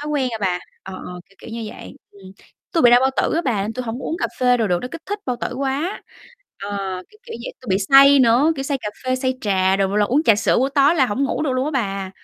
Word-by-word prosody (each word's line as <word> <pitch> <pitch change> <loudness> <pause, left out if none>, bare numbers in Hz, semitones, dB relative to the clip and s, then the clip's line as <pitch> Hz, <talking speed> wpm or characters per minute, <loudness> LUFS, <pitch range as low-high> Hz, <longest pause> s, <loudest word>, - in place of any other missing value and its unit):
thói 295 - -6
quen 270 -4 0
rồi 225 - -5
bà, 180 -2 0 0.2
ờ, 190 - -9
ờ, 180 0 -8
kiểu 195 - -26
kiểu - - -10
như 230 0 -5
vậy, - - -11
ừm. 190 -2 -15 0.4
Tôi 335 - +2
bị 240 - +7
đau 245 - +6
bao 265 +1 +2
tử - - +1
á 335 - +1
bà 220 -7 0
nên 215 - -3
tui 255 +2 -4
hổng 230 +2 -4
có - - -7
uống 325 - -2
cà - - 0
phê 250 -1 +3
đồ 220 -4 0
được, 175 -1 +1
nó 250 - -4
kích 335 -1 -8
thích 410 +1 -3
bao 250 - -1
tử - - -3
quá, 280 +7 -2 0.6
ờ, 195 -2 -4
kiểu 425 - -21
kiểu - - -9
vậy, - - -6
tôi 255 - -16
bị 190 - +2
say 275 +1 +8
nữa, 255 +6 +4
kiểu, 270 - -3
say 275 -1 -2
cà 210 - -5 0.2
phê, 255 0 0
say 260 0 -1
trà 190 -2 +1
đồ, 195 -1 +1
mà 200 - -2
là 210 - +3
uống 265 +8 +1
trà 225 -9 +5
sữa 210 - +1
buổi 265 +3 +1
tối 285 +3 +4
là 270 -6 +3
hổng 260 +6 -1
ngủ 275 - -2
được 280 - 0
luôn 255 +1 0
á 300 - -2
bà. 195 -8 -2
250 Hz, 305 wpm, -20 LUFS, 200-275 Hz, 0.6 s, say